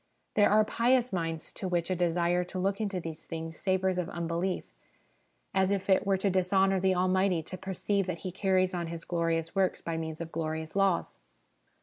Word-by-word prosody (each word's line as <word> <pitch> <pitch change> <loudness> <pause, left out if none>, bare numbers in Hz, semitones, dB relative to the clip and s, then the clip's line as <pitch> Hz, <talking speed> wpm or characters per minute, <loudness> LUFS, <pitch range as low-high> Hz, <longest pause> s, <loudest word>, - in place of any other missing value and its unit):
There 205 -1 +5
are 215 +1 +5
pious 240 +1 +2
minds 165 -3 -3
to 190 - -4
which 175 0 0
a - - +2
desire 175 0 +1
to 185 - -7
look 195 +3 0
into 200 -3 -1
these 165 -2 -7
things 165 0 -5
savours 190 0 0
of 180 0 -2
unbelief, 170 +1 -2 0.9
as 190 -1 +3
if 200 -1 0
it 190 - +3
were 195 -1 +3
to 195 +1 +1
dishonour 190 +1 +3
the 190 0 +2
Almighty 185 -1 +2
to 185 - -7
perceive 190 +1 -1
that 180 -2 -2
He 185 - -2
carries 185 0 +1
on 170 -2 -2
His 165 0 -6
glorious 165 -1 -1
works 190 -1 +1
by 165 -1 -3
means 160 -1 -4
of 165 -1 -6
glorious 160 0 -3
laws. 195 -3 +1
185 Hz, 195 wpm, -30 LUFS, 165-195 Hz, 0.9 s, There